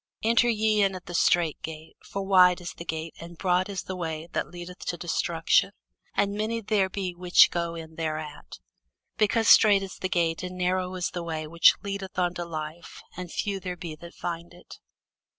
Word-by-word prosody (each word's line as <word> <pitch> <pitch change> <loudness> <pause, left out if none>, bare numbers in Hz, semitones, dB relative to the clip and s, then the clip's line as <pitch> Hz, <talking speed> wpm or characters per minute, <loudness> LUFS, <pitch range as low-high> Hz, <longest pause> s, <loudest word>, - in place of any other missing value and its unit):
Enter 235 +2 +4
ye 215 -1 +2
in 195 -1 +2
at 180 - -9
the 175 - -8
strait 170 -2 +2
gate: 160 0 -8
for 195 - -5
wide 180 -2 +6
is 175 -1 -7
the 170 - -9
gate, 160 0 -4
and 170 0 -10
broad 185 +1 +1
is 195 -2 -4
the 185 - -5
way, 160 -2 -4
that - - -1
leadeth 175 +1 -9
to 175 - -2
destruction, 165 -1 +1 0.4
and 200 0 +1
many 215 +2 -1
there 205 -3 +1
be 185 -2 -3
which 175 0 +5
go 170 -1 -2
in 160 -1 -9
thereat: 155 -2 -5 0.6
because 220 +1 +2
strait 205 -2 +7
is 195 - -8
the 185 - -3
gate, 165 -2 0
and 180 0 -6
narrow 185 0 0
is 180 -2 -2
the 175 - -4
way, 160 -2 -4
which 170 +2 +5
leadeth 195 -2 -5
unto 175 -1 0
life, 160 0 -7
and 180 -1 -7
few 200 -1 -2
there 180 -1 -5
be 165 -2 -6
that 170 +2 -12
find 170 0 -5
it. 175 - -14
180 Hz, 195 wpm, -27 LUFS, 170-195 Hz, 0.6 s, strait